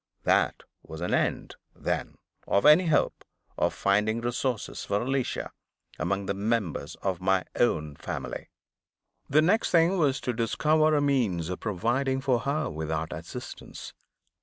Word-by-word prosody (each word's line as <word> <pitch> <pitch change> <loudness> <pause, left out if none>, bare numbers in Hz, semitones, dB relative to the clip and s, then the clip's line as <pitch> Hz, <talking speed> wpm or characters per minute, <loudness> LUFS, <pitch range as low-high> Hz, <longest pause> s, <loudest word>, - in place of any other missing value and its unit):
There - - +3 0.3
was 80 - -9
an 90 - -1
end, - - 0 0.2
then, - - -3 0.3
of 100 - +2
any 155 +4 +7
hope 155 - +1 0.3
of - - +1
finding 105 +3 +1
resources 120 0 -2
for 100 0 0
Alicia 135 0 -2 0.5
among 95 +5 -1
the 100 - -1
members 100 -7 -2
of 95 -2 -1
my 95 0 +2
own 75 -11 +1
family. - - -5 0.8
The 155 +3 +5
next 210 +7 +3
thing 170 +3 +4
was 135 -4 +2
to 125 - -1
discover 155 +7 +2
a 145 - +3
means 115 - +1
of 90 - -4
providing 120 +6 0
for 130 -3 +1
her 145 +5 -1
without 80 +1 -3
assistance. - - -8
115 Hz, 140 wpm, -27 LUFS, 95-140 Hz, 0.8 s, any